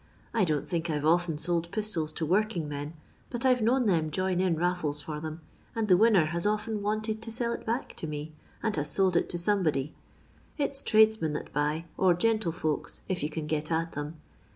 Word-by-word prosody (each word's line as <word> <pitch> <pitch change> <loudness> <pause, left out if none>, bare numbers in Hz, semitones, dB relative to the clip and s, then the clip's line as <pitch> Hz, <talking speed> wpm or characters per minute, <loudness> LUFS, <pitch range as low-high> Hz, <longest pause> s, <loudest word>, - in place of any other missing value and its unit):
I 220 -5 +3
don*t 150 -4 0
think 170 -1 -2
I 155 - +1
'to 145 - -3
often 165 -1 +3
lold 170 -1 0
piitola 205 -6 -1
to 160 - -1
woiking 185 -1 +1
men, 145 +2 -5 0.3
but 240 0 -4
I 260 - +7
're 250 - -2
known 245 +3 +3
them 165 -6 +2
join 185 +2 0
in 185 -3 +2
laiBee 165 -3 0
for 150 -1 -4
them, 155 +1 -6 0.3
and 225 -1 0
the 185 - +7
winner 205 -4 +5
has 170 +2 -2
often 215 0 -1
wanted 215 +1 -1
to 225 0 -6
sell 235 +1 -1
it - - -7
back 235 +4 -2
to 160 - -4
me, 150 +1 -5 0.3
and 220 -2 +1
has 145 0 0
sold 190 +2 +3
it - - +2
to 175 - -2
somebody. 170 -7 +1 0.6
It's 280 -2 0
tradesmen 215 -8 +4
that 150 - -5
buy, 150 +3 0
or 185 -2 +5
gentlefolks, 175 -7 0
if 185 -1 -2
yon 150 - -1
can 155 0 -4
get 155 +1 -2
at 165 +1 0
them. 145 +2 -5
175 Hz, 210 wpm, -29 LUFS, 155-215 Hz, 0.6 s, I